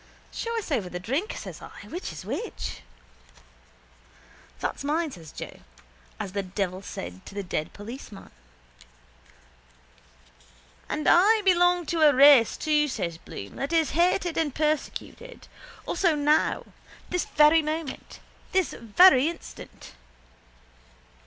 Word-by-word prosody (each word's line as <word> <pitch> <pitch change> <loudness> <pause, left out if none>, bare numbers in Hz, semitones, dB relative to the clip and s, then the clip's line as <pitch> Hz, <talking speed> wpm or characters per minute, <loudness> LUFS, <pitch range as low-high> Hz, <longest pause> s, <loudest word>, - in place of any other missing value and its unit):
—Show 465 0 -4
us 425 -7 -5
over 210 -10 -1
the 180 - -5
drink, 275 - -2
says - - -8
I. - - -11
Which 355 +3 -6
is - - -9
which? 470 - -5 1.8
—That's - - -3
mine, 310 +2 -1
says 165 - -11
Joe, - - -9 0.6
as 190 - -4
the 200 +1 -2
devil 190 -1 -3
said 90 - -8
to - - -11
the 200 - -3
dead 155 -4 -3
policeman. 210 -1 -10 2.6
—And 300 - -2
I 420 +5 +5
belong 355 -1 +4
to 330 +2 -1
a 295 -3 +6
race 275 -4 +7
too, 300 -1 +2
says 175 - -4
Bloom, 100 -10 -9
that 275 +3 -3
is 320 -3 +2
hated 350 +2 +1
and 295 -5 -1
persecuted. 310 - -3 0.4
Also 345 -5 +1
now. 295 +1 +1 0.5
This 360 -1 0
very 305 +2 +5
moment. 310 -2 -5 0.3
This 375 -3 +1
very 260 - +5
instant. 335 - -11
300 Hz, 125 wpm, -26 LUFS, 205-340 Hz, 2.6 s, race